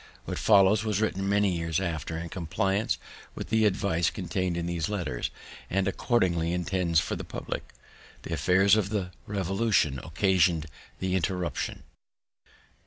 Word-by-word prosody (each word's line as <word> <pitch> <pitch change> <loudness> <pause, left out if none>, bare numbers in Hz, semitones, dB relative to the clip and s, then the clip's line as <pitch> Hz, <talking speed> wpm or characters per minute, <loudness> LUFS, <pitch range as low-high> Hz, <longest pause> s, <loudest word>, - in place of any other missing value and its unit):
What - - -4
follows 100 +2 +5
was 105 -3 0
written 100 -3 0
many 100 -2 +2
years 85 -1 -1
after 80 -3 -3
in 85 +1 -5
compliance 95 +5 0 0.4
with - - -6
the 110 -1 +4
advice 95 -4 +2
contain'd 90 -1 -2
in 85 - -2
these 85 +1 -2
letters, 85 -12 -2 0.4
and 95 0 +1
accordingly 90 -5 +1
intended 90 -1 0
for - - +2
the - - -5
public. - - -6 0.5
The - - -5
affairs 95 +3 +4
of 105 -3 0
the 100 -4 -2 0.2
Revolution 95 - +1
occasion'd 85 -1 +2 0.3
the 95 -1 -2
interruption. 90 -3 -2
95 Hz, 140 wpm, -28 LUFS, 85-100 Hz, 0.5 s, follows